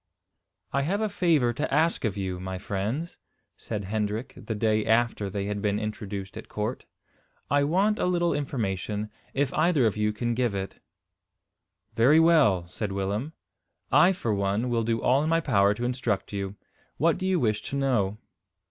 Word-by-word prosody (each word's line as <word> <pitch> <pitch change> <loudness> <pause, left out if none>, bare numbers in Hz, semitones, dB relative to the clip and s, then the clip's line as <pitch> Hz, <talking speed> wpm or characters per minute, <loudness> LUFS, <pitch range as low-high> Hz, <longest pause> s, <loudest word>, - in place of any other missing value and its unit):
"I 140 - +2
have 185 +9 0
a 215 -1 0
favour 160 -11 +2
to 145 +6 -3
ask 155 -1 +2
of 105 -2 -1
you, 95 -2 -3
my 95 0 -5
friends," 105 - -3 0.4
said 105 -2 -5
Hendrik, 110 +5 -2
the 110 - -5
day 110 0 +1
after 110 -3 +1
they 100 +1 -3
had 105 0 -3
been 105 -1 +1
introduced 105 -2 -5
at 110 - -9
court. 105 +4 -3 0.7
"I 145 0 +4
want 195 +8 +2
a - - +1
little 175 -1 +1
information, 105 -6 -2 0.2
if 140 0 0
either 155 -5 +3
of 110 - +1
you 105 0 +1
can 120 +2 -2
give 120 -3 0
it." 95 0 -5 1.1
"Very 135 +8 +5
well," 145 - +4
said 100 +3 -4
Willem; 100 +10 -2 0.6
"I, 185 - +6
for 120 - -1
one, 100 +5 0
will 115 -1 +1
do 115 0 0
all 130 +3 +4
in 155 - 0
my 165 0 +3
power 100 -9 +3
to 120 +3 -3
instruct 125 -6 -2
you. 100 0 -3 0.4
What 165 +4 +2
do 185 - -1
you 185 -2 +2
wish 110 -5 +1
to - - -4
know?" 115 -8 +1
115 Hz, 175 wpm, -27 LUFS, 100-145 Hz, 1.1 s, I